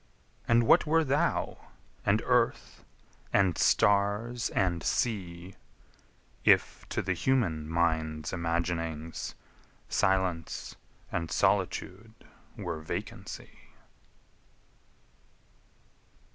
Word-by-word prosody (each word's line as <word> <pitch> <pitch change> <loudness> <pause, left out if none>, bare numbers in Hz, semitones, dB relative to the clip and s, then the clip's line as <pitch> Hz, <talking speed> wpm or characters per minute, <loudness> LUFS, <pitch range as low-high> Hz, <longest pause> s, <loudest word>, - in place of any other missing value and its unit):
And 115 0 +4
what 115 - +5
were 160 +1 +4
thou, 140 0 0 0.4
and 105 +3 +2
earth, 125 -2 +1 0.5
and 95 -4 +3
stars, 105 +4 +2
and 90 -3 0
sea, 90 -5 -2 0.9
If - - +3
to - - -2
the 95 0 0
human 85 -8 0
mind's 80 -2 0
imaginings 85 -2 -2 0.5
Silence 95 -4 0 0.4
and 85 -1 -2
solitude 110 +4 0 0.4
were 80 - -4
vacancy? 80 - -7
90 Hz, 75 wpm, -29 LUFS, 85-110 Hz, 0.9 s, what